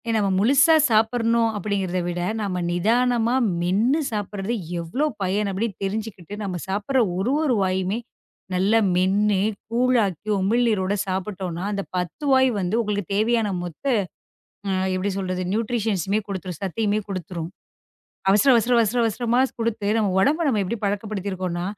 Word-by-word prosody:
நாம 205 Hz, -3 st, +2 dB
முழுசா 275 Hz, -, +5 dB
சாப்பிடணும் 230 Hz, +1 st, +2 dB
அப்படிங்கறத 195 Hz, -3 st, -1 dB
விட 175 Hz, 0 st, -2 dB, 0.2 s
நாம 185 Hz, -4 st, -2 dB
நிதானமா 235 Hz, +6 st, +2 dB, 0.2 s
மென்னு 210 Hz, -, +2 dB
சாப்பிடுறது 205 Hz, +1 st, -3 dB, 0.3 s
எவ்வளவு 175 Hz, -, -1 dB, 0.2 s
பயன் 200 Hz, +2 st, 0 dB
அப்படி 205 Hz, +5 st, -1 dB, 0.2 s
தெரிஞ்சுக்கிட்டு 205 Hz, -2 st, -4 dB
நாம 190 Hz, -3 st, -3 dB
சாப்பிடுற 210 Hz, +7 st, 0 dB, 0.2 s
ஒரு, 215 Hz, +8 st, 0 dB
ஒரு 275 Hz, -, +2 dB
வாயுமே 190 Hz, +3 st, 0 dB, 0.5 s
நல்லா 200 Hz, +5 st, +3 dB, 0.2 s
மென்னு 195 Hz, +2 st, +2 dB, 0.3 s
கூழ் 250 Hz, +2 st, +2 dB
ஆக்கி 195 Hz, +3 st, -5 dB
உமிழ்நீரோட 205 Hz, -1 st, +1 dB
சாப்பிட்டோம்னா 185 Hz, -2 st, -3 dB
அந்தப் 200 Hz, -1 st, -4 dB
10 180 Hz, -, -4 dB
வாய் 260 Hz, 0 st, +5 dB
வந்து 185 Hz, +2 st, -1 dB
உங்களுக்குத் 205 Hz, -3 st, -3 dB
தேவையான 220 Hz, -1 st, +1 dB
மொத்த 175 Hz, -, -8 dB, 0.8 s
அ -, -, -1 dB, 0.2 s
எப்படி 185 Hz, +2 st, -1 dB
சொல்றது 185 Hz, -1 st, -2 dB
ந்யூட்ரிஷன்ஸ்மே 215 Hz, -3 st, 0 dB
கொடுத்துரும் 185 Hz, -4 st, -5 dB
சத்தயுமே 210 Hz, +2 st, 0 dB
கொடுத்துரும். 175 Hz, -3 st, -5 dB, 0.8 s
அவசர 205 Hz, +7 st, +4 dB
அவசர 235 Hz, +2 st, +2 dB
அவசர 230 Hz, +2 st, +1 dB
அவசரமா 235 Hz, +2 st, +1 dB, 0.2 s
குடுத்து 225 Hz, -3 st, -1 dB
நம்ம 210 Hz, -, +2 dB
உடம்ப 310 Hz, -, +2 dB
நம்ம 220 Hz, -6 st, +1 dB
எப்படி 225 Hz, +5 st, -3 dB
பழக்கப்படுத்தி 200 Hz, -1 st, -2 dB
இருக்கோனா, 180 Hz, -2 st, -3 dB
205 Hz, 135 wpm, -23 LUFS, 185-230 Hz, 0.8 s, முழுசா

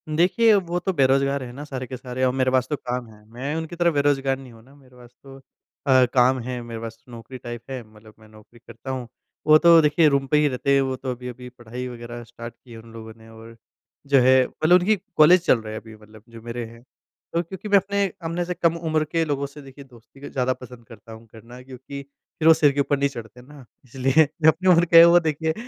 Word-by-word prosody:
देखिए, 215 Hz, +7 st, +3 dB
वो 175 Hz, -2 st, -1 dB
तो 190 Hz, +2 st, -2 dB
बेरोजगार 135 Hz, -1 st, +1 dB
है 120 Hz, -, -8 dB
ना 145 Hz, +3 st, -8 dB
सारे 130 Hz, -3 st, -7 dB
के 130 Hz, -, -7 dB
सारे 125 Hz, +1 st, -5 dB
और 125 Hz, -, +2 dB
अ, -, -, -6 dB
मेरे 130 Hz, -1 st, +1 dB
पास 130 Hz, 0 st, +1 dB
तो 150 Hz, -, -1 dB
काम 125 Hz, -3 st, -5 dB
है। 105 Hz, -1 st, -18 dB
मैं 135 Hz, +6 st, -5 dB
उनकी 160 Hz, +1 st, -5 dB
तरह 170 Hz, 0 st, +2 dB
बेरोजगार 140 Hz, -2 st, 0 dB
नहीं 130 Hz, -2 st, -13 dB
हूँ 115 Hz, 0 st, -17 dB
ना 135 Hz, +3 st, -20 dB
मेरे 130 Hz, -3 st, -22 dB
पास 120 Hz, -1 st, -16 dB
तो 135 Hz, 0 st, -13 dB, 0.5 s
अ, 130 Hz, -2 st, +5 dB
काम 130 Hz, +1 st, +3 dB
है, 125 Hz, 0 st, -5 dB
मेरे 115 Hz, -1 st, -8 dB
पास 115 Hz, 0 st, -8 dB
तो 125 Hz, -, -17 dB
नौकरी 120 Hz, +2 st, -10 dB
टाइप 120 Hz, -2 st, -8 dB
है। 130 Hz, -2 st, -5 dB
मतलब 110 Hz, 0 st, -17 dB
मैं 110 Hz, -, -18 dB
नौकरी 110 Hz, +2 st, -19 dB
करता 130 Hz, +3 st, -9 dB
हूँ। 130 Hz, -2 st, -5 dB, 0.4 s
वो 155 Hz, 0 st, +8 dB
तो 170 Hz, 0 st, +6 dB
देखिए 150 Hz, +2 st, +3 dB
रूम 140 Hz, -1 st, 0 dB
पे 150 Hz, -, +2 dB
ही 150 Hz, 0 st, +3 dB
रहते 140 Hz, +1 st, -1 dB
हैं 135 Hz, -, +3 dB
वो 130 Hz, -1 st, -2 dB
तो 130 Hz, 0 st, -5 dB
अभी-अभी 125 Hz, 0 st, -9 dB
पढ़ाई 125 Hz, 0 st, -8 dB
वग़ैरह 120 Hz, -1 st, -9 dB
स्टार्ट 115 Hz, 0 st, -10 dB
की 125 Hz, -, -18 dB
है 115 Hz, -, -10 dB
उन 115 Hz, 0 st, -15 dB
लोगों 110 Hz, -1 st, -10 dB
ने 110 Hz, 0 st, -17 dB
और 115 Hz, +1 st, -14 dB, 0.5 s
जो 140 Hz, -1 st, +4 dB
है 130 Hz, +1 st, +5 dB
मतलब 155 Hz, +3 st, 0 dB
उनकी 205 Hz, +5 st, +2 dB, 0.2 s
कॉलेज 175 Hz, +3 st, +6 dB
चल 130 Hz, -, +3 dB
रहा 110 Hz, 0 st, -8 dB
है 110 Hz, -, -5 dB
अभी 110 Hz, -1 st, -14 dB
मतलब 105 Hz, 0 st, -18 dB
जो 115 Hz, -1 st, -13 dB
मेरे 120 Hz, 0 st, -6 dB
हैं। 115 Hz, +1 st, -14 dB, 0.5 s
तो 170 Hz, -, +1 dB
क्योंकि 190 Hz, +4 st, -9 dB
मैं 200 Hz, -, +6 dB
अपने 200 Hz, +1 st, 0 dB, 0.2 s
अपने 165 Hz, +2 st, -2 dB
से 180 Hz, -, -3 dB
कम 170 Hz, -1 st, 0 dB
उम्र 160 Hz, -2 st, -1 dB
के 165 Hz, +1 st, -1 dB
लोगों 140 Hz, -2 st, -2 dB
से 145 Hz, +1 st, -11 dB
देखिए 140 Hz, +1 st, -13 dB
दोस्ती 130 Hz, +3 st, -14 dB
ज़्यादा 130 Hz, -1 st, -1 dB
पसंद 125 Hz, -2 st, -14 dB
करता 115 Hz, 0 st, -15 dB
हूँ 110 Hz, +1 st, -13 dB
करना 115 Hz, +3 st, -13 dB
क्योंकि 135 Hz, +2 st, -10 dB
फ़िर 140 Hz, +3 st, -6 dB
वो 160 Hz, -, +9 dB
सिर 155 Hz, -3 st, +3 dB
के 140 Hz, -, -4 dB
ऊपर 140 Hz, 0 st, 0 dB
नहीं 140 Hz, 0 st, 0 dB
चढ़ते 120 Hz, -1 st, -11 dB
ना 140 Hz, 0 st, -15 dB, 0.2 s
इसलिए 135 Hz, +5 st, +2 dB, 0.2 s
जो 155 Hz, -, +4 dB
अपनी 185 Hz, +3 st, +1 dB
उम्र 170 Hz, -1 st, +5 dB
के 165 Hz, 0 st, +8 dB
वो 175 Hz, +1 st, +6 dB
देखिए 160 Hz, 0 st, -2 dB
130 Hz, 250 wpm, -23 LUFS, 120-150 Hz, 0.5 s, वो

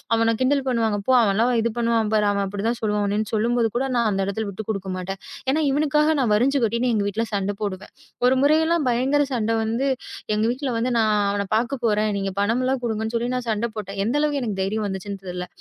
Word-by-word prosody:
"அவனைக் 230 Hz, 0 st, +1 dB
கிண்டல் 275 Hz, +2 st, +3 dB
பண்ணுவாங்க. 225 Hz, -4 st, +1 dB
போ, 260 Hz, -, +4 dB
அவன் 200 Hz, -3 st, +2 dB
எல்லாம் 235 Hz, +4 st, +2 dB
இது 235 Hz, -, +1 dB
பண்ணுவான். 230 Hz, -2 st, +1 dB
பாரு, 210 Hz, -1 st, +3 dB
அவன் 200 Hz, 0 st, 0 dB
அப்டி 200 Hz, +2 st, -4 dB
தான் 240 Hz, -, -1 dB
சொல்லுவான்." 210 Hz, -1 st, 0 dB
அப்டின்னு 210 Hz, +1 st, -1 dB
சொல்லும்பொழுது 230 Hz, 0 st, +1 dB
கூட, 270 Hz, +2 st, 0 dB
நான் 235 Hz, -2 st, +2 dB
அந்த 195 Hz, 0 st, 0 dB
இடத்துல 215 Hz, +2 st, -2 dB
விட்டுக் 200 Hz, +2 st, -7 dB
குடுக்க 195 Hz, -3 st, -3 dB
மாட்டேன். 190 Hz, +1 st, -5 dB, 0.3 s
ஏன்னா, 310 Hz, +3 st, +1 dB
இவனுக்காக 300 Hz, +2 st, +2 dB
நான் 245 Hz, -5 st, +1 dB
வரிஞ்சு 265 Hz, +6 st, +3 dB
கட்டிட்டு 235 Hz, +3 st, 0 dB
எங்க 205 Hz, -2 st, +1 dB
வீட்டுல 215 Hz, +3 st, -1 dB
சண்ட 200 Hz, 0 st, 0 dB
போடுவேன். 200 Hz, -1 st, -5 dB, 0.3 s
ஒரு 255 Hz, +1 st, +4 dB
முறை 300 Hz, +2 st, +5 dB
எல்லாம் 330 Hz, -3 st, +1 dB
பயங்கர 265 Hz, +4 st, +2 dB
சண்ட 225 Hz, -2 st, 0 dB
வந்து 230 Hz, +5 st, -1 dB, 0.5 s
எங்க 215 Hz, -, +1 dB
வீட்டுல 260 Hz, +1 st, -3 dB
வந்து, 240 Hz, +2 st, 0 dB
நான் 215 Hz, -1 st, +3 dB, 0.2 s
அவன 200 Hz, 0 st, -1 dB
பாக்க 245 Hz, +4 st, 0 dB
போறேன். 215 Hz, -1 st, +2 dB
நீங்கப் 195 Hz, 0 st, -4 dB
பணம் 230 Hz, +5 st, +1 dB
எல்லாம் 260 Hz, 0 st, 0 dB
குடுங்கன்னு 220 Hz, 0 st, -2 dB
சொல்லி 240 Hz, +1 st, -2 dB
நான் 245 Hz, -2 st, -4 dB
சண்ட 220 Hz, +2 st, 0 dB
போட்டேன். 195 Hz, -1 st, -5 dB
எந்த 235 Hz, +6 st, 0 dB
அளவுக்கு 290 Hz, -2 st, 0 dB
எனக்குத் 200 Hz, -5 st, -2 dB
தைரியம் 210 Hz, +2 st, -1 dB
வந்துச்சுன்னு 195 Hz, 0 st, -5 dB
தெரியல. 180 Hz, 0 st, -5 dB
225 Hz, 225 wpm, -23 LUFS, 205-250 Hz, 0.5 s, முறை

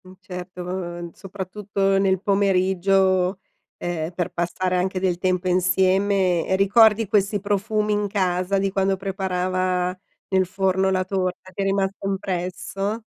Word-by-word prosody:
Mh, 185 Hz, -, -13 dB
certo, 180 Hz, -1 st, -8 dB
uhm 175 Hz, -1 st, -5 dB
soprattutto 195 Hz, 0 st, -2 dB
nel 190 Hz, -1 st, +2 dB
pomeriggio, 190 Hz, -1 st, +2 dB, 0.4 s
ehm, 170 Hz, -2 st, -3 dB
per 175 Hz, -1 st, -2 dB
passare 180 Hz, +2 st, -1 dB
anche 185 Hz, +1 st, 0 dB
del 180 Hz, -2 st, 0 dB
tempo 185 Hz, 0 st, 0 dB
insieme 185 Hz, 0 st, +2 dB
e 190 Hz, -, +2 dB
ricordi 210 Hz, +2 st, +5 dB
questi 205 Hz, +1 st, +1 dB
profumi 210 Hz, +1 st, 0 dB
in 205 Hz, 0 st, 0 dB
casa 185 Hz, -1 st, 0 dB
di 195 Hz, 0 st, 0 dB
quando 195 Hz, 0 st, +1 dB
preparava 185 Hz, -1 st, -1 dB, 0.3 s
nel 190 Hz, -1 st, +2 dB
forno 190 Hz, 0 st, +1 dB
la 185 Hz, -1 st, +1 dB
torta? 185 Hz, -1 st, -3 dB
Ti 190 Hz, -, -5 dB
è -, -, 0 dB
rimasto 195 Hz, 0 st, -1 dB
impresso? 195 Hz, +2 st, -3 dB
190 Hz, 135 wpm, -23 LUFS, 180-195 Hz, 0.4 s, ricordi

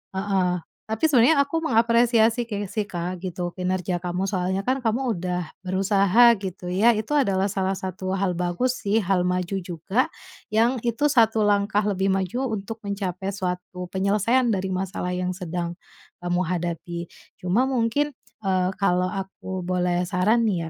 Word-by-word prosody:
heeh, 190 Hz, -3 st, 0 dB, 0.2 s
tapi 220 Hz, +4 st, -4 dB
sebenarnya 280 Hz, +3 st, +5 dB
aku 285 Hz, +4 st, -2 dB
mengapresiasi 235 Hz, -3 st, +3 dB, 0.2 s
sih 215 Hz, -3 st, -2 dB
Kak 180 Hz, -1 st, -4 dB
gitu, 180 Hz, -1 st, -4 dB
kinerja 180 Hz, -1 st, -2 dB
kamu 180 Hz, +1 st, -2 dB
soalnya 190 Hz, 0 st, -1 dB
kan 255 Hz, +5 st, 0 dB
kamu 245 Hz, +1 st, 0 dB
udah 180 Hz, -1 st, -3 dB
berusaha 195 Hz, +4 st, +4 dB
gitu 185 Hz, -2 st, -5 dB
ya, 220 Hz, +6 st, +4 dB
itu 215 Hz, +5 st, -4 dB
adalah 200 Hz, -8 st, +2 dB
salah 190 Hz, -1 st, 0 dB
satu 185 Hz, 0 st, -4 dB
hal 195 Hz, -1 st, 0 dB
bagus 180 Hz, +9 st, -1 dB
sih 210 Hz, +2 st, +1 dB
hal 180 Hz, -1 st, +1 dB
maju 180 Hz, +1 st, -1 dB
juga, 190 Hz, -, -1 dB, 0.5 s
yang 235 Hz, +4 st, +3 dB
itu 285 Hz, +6 st, +2 dB
1 225 Hz, -4 st, +4 dB
langkah 205 Hz, 0 st, +2 dB
lebih 195 Hz, -2 st, 0 dB
maju 195 Hz, +8 st, -1 dB
untuk 220 Hz, 0 st, -4 dB
mencapai 195 Hz, -1 st, -3 dB
suatu 180 Hz, -1 st, -4 dB
penyelesaian 210 Hz, +6 st, +2 dB
dari 190 Hz, 0 st, -2 dB
masalah 185 Hz, -1 st, -2 dB
yang 180 Hz, 0 st, -2 dB
sedang, 175 Hz, -1 st, -4 dB, 0.5 s
kamu 175 Hz, 0 st, +1 dB
hadapi. 170 Hz, 0 st, -3 dB, 0.2 s
Cuma 200 Hz, +9 st, +1 dB
mungkin, 265 Hz, +3 st, 0 dB, 0.3 s
eee, 185 Hz, -2 st, +1 dB
kalau 185 Hz, -2 st, +2 dB
aku 190 Hz, -2 st, -5 dB
boleh 180 Hz, -1 st, 0 dB
saran 215 Hz, +6 st, +2 dB
nih 170 Hz, -6 st, -1 dB
190 Hz, 150 wpm, -24 LUFS, 180-225 Hz, 0.5 s, sebenarnya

